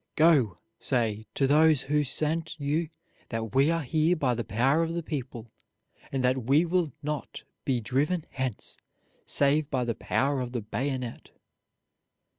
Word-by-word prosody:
Go, 145 - +4 0.2
say 110 -4 0
to 135 - +2
those 150 0 +5
who 150 +1 +1
sent 155 +3 -2
you 150 +3 -1 0.4
that 115 -2 -4
we 135 +3 +4
are 165 -1 0
here 160 +5 +2
by 135 -6 +1
the 120 0 -2
power 130 +10 +2
of 165 0 -1
the 170 - -2
people, 130 -7 -5 0.6
and 135 -2 -1
that 125 -1 +1
we 145 +7 +4
will 175 -3 +1
not 150 0 -4 0.2
be 130 -3 +1
driven 145 +9 0
hence, 130 -5 -4 0.5
save 145 +1 +3
by 130 -3 0
the 115 - 0
power 135 +4 0
of 125 0 -5
the 120 - -2
bayonet." 125 +2 -4
140 Hz, 155 wpm, -28 LUFS, 125-155 Hz, 0.6 s, those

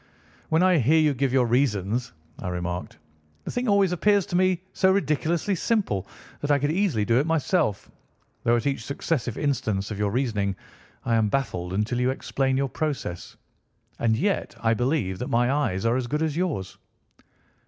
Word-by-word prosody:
"When 160 +3 +3
I 185 -3 +4
hear 145 +6 +4
you 155 -2 +3
give 135 0 0
your 130 -1 +3
reasons," 120 -2 0 0.3
I - - -5
remarked, 90 -2 -4 0.5
"the - - -5
thing 245 0 -2
always 200 -3 +3
appears 200 +2 +3
to 190 - -4
me 185 0 +3
to - - -15
be - - -37
so 190 - +3
ridiculously 170 +1 0
simple 190 - 0 0.3
that 145 - -4
I 145 - +5
could 145 +2 0
easily 165 - +1
do 115 +3 +3
it 145 - 0
myself, 160 - 0 0.5
though 120 - +3
at 120 - -1
each 135 -5 -1
successive 140 -2 -2
instance 110 -8 -1
of 105 - -5
your 105 -1 +1
reasoning 105 -5 -1 0.5
I 115 - +1
am 110 -2 +3
baffled 90 -9 -2
until 105 +5 0
you 125 +1 +2
explain 130 0 -1
your 135 0 +1
process. 135 - -4 0.6
And 110 -1 +2
yet 195 - -1
I 115 0 +3
believe 120 - 0
that 125 - -3
my 120 +2 +2
eyes 115 -9 0
are 115 +1 +3
as 130 -2 -2
good 150 +4 -1
as 155 -2 -1
yours." 155 - -2
130 Hz, 185 wpm, -25 LUFS, 110-160 Hz, 0.6 s, I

